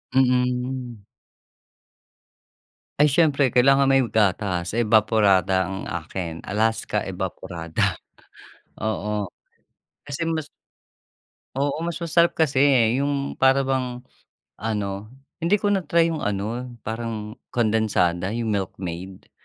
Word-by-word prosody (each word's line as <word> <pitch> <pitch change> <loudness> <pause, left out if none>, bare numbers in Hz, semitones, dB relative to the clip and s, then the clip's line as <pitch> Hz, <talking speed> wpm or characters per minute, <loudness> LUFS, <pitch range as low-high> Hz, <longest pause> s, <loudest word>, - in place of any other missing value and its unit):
Mm. 125 -2 0 2.0
Ay, 150 - +6
siyempre 145 -3 +3
kailangan 135 +3 +4
may 135 -1 +4
gatas, 100 -3 0
evaporada 105 -4 +3
ang 95 +2 -5
akin, 85 0 -5
Alaska 110 0 0
Evaporada, 90 -3 -3 0.9
oo. 105 -2 -2 0.7
Kasi 145 +3 -4
mas 160 -2 -2 1.1
Oo, 145 +4 -1
mas 170 0 -4
masarap 170 +1 +3
kasi, 150 -4 +1 0.4
'yong 140 0 -1
para 135 +1 +4
bang 130 -2 -2 0.6
ano, 105 -2 -3 0.3
hindi 170 +4 +3
ko 205 0 0
na-try 170 -3 +2
'yong 160 - -3
ano, 105 +4 -3 0.2
parang 110 0 -5
kondensada, 105 -6 +1
'yong 115 -2 -1
Milkmaid. 95 -2 -5
115 Hz, 95 wpm, -23 LUFS, 100-135 Hz, 2.0 s, Ay